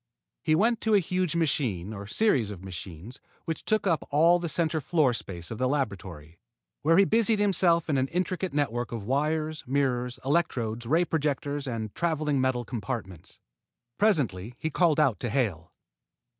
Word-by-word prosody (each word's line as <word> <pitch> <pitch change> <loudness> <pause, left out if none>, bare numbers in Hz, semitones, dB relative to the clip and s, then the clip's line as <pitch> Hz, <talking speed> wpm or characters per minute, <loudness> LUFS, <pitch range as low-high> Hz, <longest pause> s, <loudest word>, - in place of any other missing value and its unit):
He 155 - +2
went 225 +6 +2
to 220 -1 +3
a - - +6
huge 180 -1 -1
machine 120 - 0
or 100 -1 -7
series 130 - +2
of 95 -3 -8
machines 95 - -8 0.3
which 165 -2 -4
took 215 -1 +1
up 165 -6 0
all 165 +4 +4
the 170 -1 -3
center 160 -1 0
floor 145 -3 +2
space 90 -6 -6
of 115 - -5
the 130 - +2
laboratory, 95 - -4 0.4
where 165 +3 +4
he 200 - +6
busied 225 +1 +2
himself 185 -5 +2
in 140 -3 +1
an 130 - +1
intricate 180 +3 -2
network 120 -5 -1
of 115 -3 -4
wires, 155 +4 -1
mirrors, 125 -2 0
electrodes, 120 -7 0
ray 165 +6 +3
projectors, 145 -3 -2
and 110 -4 -4
traveling 155 -5 0
metal 130 -2 0
compartments. 110 - -6 0.6
Presently 125 - +1
he 160 - -3
called 165 -3 +3
out 135 -8 +3
to 120 - -2
Hale. 100 - -1
140 Hz, 165 wpm, -27 LUFS, 115-165 Hz, 0.6 s, a